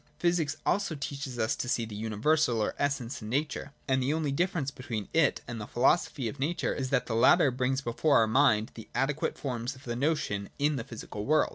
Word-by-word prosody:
Physics 170 -4 +1
also 195 -4 +1
teaches 140 -3 -5
us 110 -1 +1
to 120 - -4
see 120 -2 +1
the 110 - -9
universal 115 +5 +1
or 105 - 0
essence 140 -3 -1
in 105 - -6
Nature: 145 +2 -2 0.2
and 130 -1 +2
the 140 +4 +1
only 155 -3 -1
difference 165 -2 0
between 115 -7 -5
it 160 -3 +3
and 120 -2 -5
the 105 - -6
Philosophy 130 0 +2
of 140 +5 -6
Nature 155 +6 0
is 130 -2 -3
that - - +1
the 115 - -3
latter 135 +6 +5
brings 130 +2 0
before 140 +4 +2
our 115 - +5
mind 110 -2 +3
the 110 -2 -11
adequate 145 +3 0
forms 125 -2 -3
of 130 - -16
the 120 -2 -3
notion 120 -8 -1
in 145 +1 +2
the 125 - -3
physical 110 -2 -7
world. 155 +1 +4
130 Hz, 215 wpm, -29 LUFS, 115-150 Hz, 0.2 s, latter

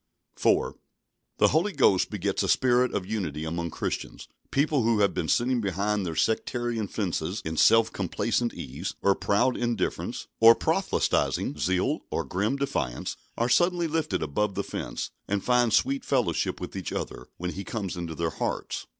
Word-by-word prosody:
4. - - +2 0.6
The - - +5
Holy 170 +8 +2
Ghost 95 - +3
begets 100 -1 -1
a - - -1
spirit 125 0 +3
of 95 - -2
unity 85 -8 -3
among 85 +1 -3
Christians. - - -4 0.2
People 145 0 +2
who 115 -2 +2
have 100 - +3
been 80 - -2
sitting 125 +4 +2
behind 100 0 -1
their 80 - -4
sectarian 115 +4 0
fences 90 -2 -2
in 80 0 -3
self 115 +7 +5
complacent 115 +5 -1
ease, 70 +8 -6
or 100 - +5
proud 100 +6 +1
indifference, 120 -5 -2
or 115 +1 +9
proselytising - - 0
zeal, 95 0 +1
or - - -1
grim 105 +8 -1
defiance, 80 - -2 0.2
are 120 - +1
suddenly 175 +7 +3
lifted 150 - -1
above 95 +7 -1
the - - -1
fence, - - -5 0.2
and 100 -1 -1
find 125 -2 +3
sweet 135 +5 +2
fellowship - - 0
with - - -7
each - - -4
other, - - -5
when 90 +1 -3
He 100 - -6
comes 100 -3 -4
into 85 -2 -5
their 85 +1 -1
hearts. - - -3
105 Hz, 165 wpm, -27 LUFS, 90-120 Hz, 0.6 s, or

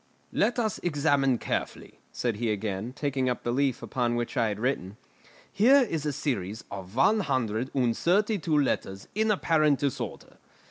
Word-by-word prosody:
"Let 245 - +1
us 220 -4 -1
examine 140 -5 +2
carefully," - - -4
said 120 -4 -2
he 115 0 0
again, 105 +2 -3
taking 135 -2 -1
up 125 - -3
the 120 - -1
leaf 135 0 0
upon 120 -3 -1
which 120 +3 -3
I 115 -4 +2
had 105 -1 -3
written. 110 -5 -2 0.6
"Here 260 +7 +6
is 155 -5 -2
a - - +1
series 110 -7 -3
of 95 0 -8
one 170 - +4
hundred 130 - -1
and 120 -4 +2
thirty 205 +4 +2
two 155 -2 +1
letters 95 -8 -1
in 220 +1 +1
apparent 155 -7 +3
disorder. 140 -1 -4
130 Hz, 170 wpm, -27 LUFS, 115-155 Hz, 0.6 s, Here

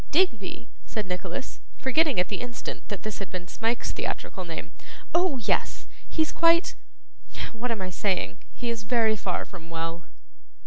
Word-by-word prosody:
'Digby!' 235 - +2 0.2
said 215 -3 -1
Nicholas, 180 +7 -3 0.2
forgetting 280 - +4
at 180 - +4
the 200 - -2
instant 245 -1 -4
that 200 - -3
this 215 -1 -3
had 195 -2 -4
been 180 -1 -4
Smike's 225 +5 0
theatrical - - -3
name. - - -5 0.4
'Oh 345 -5 +4
yes. 230 - +1 0.2
He's 315 -1 +2
quite 335 +1 +5 0.8
what 235 +2 -2
am 220 -5 0
I 185 - -3
saying? 180 - +1
he 240 -1 -2
is 230 -2 -2
very 220 0 +4
far 185 -3 -1
from 170 -3 -10
well. 165 0 -3
215 Hz, 160 wpm, -28 LUFS, 185-250 Hz, 0.8 s, quite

